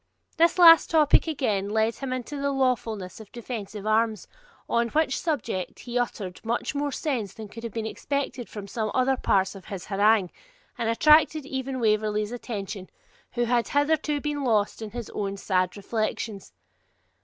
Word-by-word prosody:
This 335 +2 +4
last 330 -2 +8
topic, 310 0 +4
again, 215 -11 -1
led 220 +2 +1
him 270 -1 -5
into 255 +3 -4
the 280 - +1
lawfulness 230 -8 -1
of 215 -2 -12
defensive 215 -4 -6
arms, 220 0 +1 0.4
on 235 0 +1
which 300 +2 +1
subject 260 - -3
he 245 0 -2
uttered 200 -6 -4
much 235 +5 -2
more 285 0 -1
sense 250 - -3
than 220 -1 -8
could 230 +3 -10
have 230 - -4
been 225 +1 -4
expected 270 +1 -3
from 205 -2 -8
some 215 +1 -2
other 260 +1 +3
parts 190 -6 +1
of 195 -2 -12
his 195 -4 -7
harangue, 205 -1 +3 0.4
and 230 -2 -1
attracted 305 +4 +4
even 265 -1 -4
Waverley's 215 -1 +1
attention, 205 -5 -6 0.4
who 240 - 0
had 240 0 +1
hitherto 295 0 +1
been 290 0 -3
lost 220 -4 +1
in 220 - -5
his 235 +1 -7
own 200 -1 -3
sad 185 -1 0
reflections. 215 -1 -3
230 Hz, 165 wpm, -26 LUFS, 210-270 Hz, 0.4 s, last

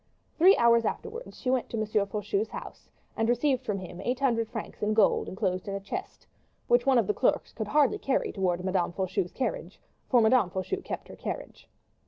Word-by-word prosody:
Three 370 +4 +6
hours 235 -1 +5
afterwards 465 - -5
she 255 - -1
went 260 -2 0
to 230 - -4
M. 215 - 0
Faucheux's 210 - -1
house - - -9 0.3
and 225 +1 0
received 255 +2 +2
from 210 -5 -2
him 180 -2 -8
eight 250 +2 -1
hundred 230 -5 +1
francs - - -7
in 215 +1 +1
gold 220 - +3
inclosed 185 -2 -2
in 200 - -3
a - - -2
chest, 195 0 -7 0.4
which 240 +2 +3
one 265 -2 +5
of 230 - +3
the 210 - 0
clerks 250 - 0
could 220 -3 -4
hardly 285 +2 +3
carry 270 - 0
towards 180 -2 -1
Madame 185 -2 0
Faucheux's 185 -1 -2
carriage - - -4 0.3
for 250 - +5
Madame 220 -3 +4
Faucheux 190 - -3
kept - - -6
her - - -10
carriage. - - -7
230 Hz, 200 wpm, -28 LUFS, 195-260 Hz, 0.4 s, Three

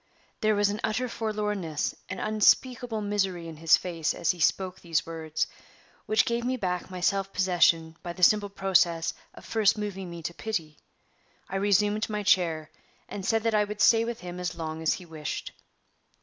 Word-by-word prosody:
There 215 0 +2
was 205 0 +3
an 210 - -4
utter 220 +4 0
forlornness, 210 -8 -2 0.2
an - - -4
unspeakable 225 +2 +2
misery 195 -4 -1
in 160 -1 -8
his 165 +1 +5
face 165 -3 -2
as - - +1
he 180 - -9
spoke 185 +3 +1
these 165 -2 -1
words, 160 -1 -2 0.6
which 215 +1 +3
gave 235 0 -1
me 255 +1 -1
back 180 -5 -2
my 185 -1 -7
self 195 +1 +1
possession 170 -4 +2
by 175 - -5
the 180 - -6
simple 205 +2 +5
process 180 -4 +2 0.2
of - - -13
first 220 -2 +2
moving 195 -3 -4
me 170 -1 -8
to 170 - -3
pity. 165 -7 -4 0.7
I 195 - -3
resumed 205 +2 +2
my 210 -1 -2
chair, 165 -5 +2 0.4
and 200 - -6
said 225 +3 +1
that 230 -1 +1
I 210 -1 +4
would 210 0 -6
stay 225 +1 +5
with 235 0 -4
him 180 0 -7
as 175 -1 -3
long 160 -1 -5
as 160 - +2
he 180 - -10
wished. 155 -2 -5
190 Hz, 185 wpm, -27 LUFS, 170-210 Hz, 0.7 s, his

